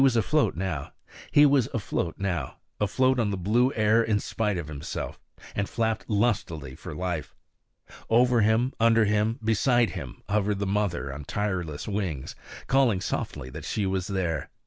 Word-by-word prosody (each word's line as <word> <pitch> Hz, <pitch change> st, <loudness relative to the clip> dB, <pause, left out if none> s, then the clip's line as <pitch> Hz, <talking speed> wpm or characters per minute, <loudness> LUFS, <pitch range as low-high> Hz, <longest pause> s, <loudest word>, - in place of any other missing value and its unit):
He 115 Hz, -, +1 dB
was 135 Hz, -5 st, +4 dB
afloat 90 Hz, -6 st, -2 dB
now, 95 Hz, -5 st, -2 dB, 0.3 s
afloat 130 Hz, +5 st, +2 dB
on 110 Hz, -3 st, +2 dB
the 100 Hz, -, -2 dB
blue 115 Hz, +8 st, +2 dB
air 110 Hz, +1 st, +4 dB
in 110 Hz, -2 st, +1 dB
spite 105 Hz, -2 st, -1 dB
of 85 Hz, -4 st, -4 dB
himself, 75 Hz, -1 st, -5 dB, 0.3 s
and 100 Hz, 0 st, -2 dB
flapped 110 Hz, -2 st, -1 dB
lustily 100 Hz, -, 0 dB
for 75 Hz, -, -8 dB
life. 85 Hz, -5 st, -3 dB, 0.7 s
Over 120 Hz, +1 st, +4 dB
him, 110 Hz, +5 st, +2 dB
under 115 Hz, -1 st, +5 dB
him, 105 Hz, +2 st, +1 dB
beside 120 Hz, +2 st, +3 dB
him -, -, -8 dB
hovered 105 Hz, 0 st, +1 dB
the 100 Hz, -, -2 dB
mother 95 Hz, -8 st, -1 dB
on 70 Hz, +1 st, -8 dB
tireless 90 Hz, -7 st, -3 dB
wings, 95 Hz, -10 st, -3 dB, 0.3 s
calling 130 Hz, -7 st, +3 dB
softly 65 Hz, -7 st, -4 dB
that -, -, -8 dB
she 105 Hz, -, -1 dB
was 95 Hz, 0 st, -1 dB
there. 90 Hz, -7 st, -2 dB
105 Hz, 145 wpm, -27 LUFS, 90-115 Hz, 0.7 s, under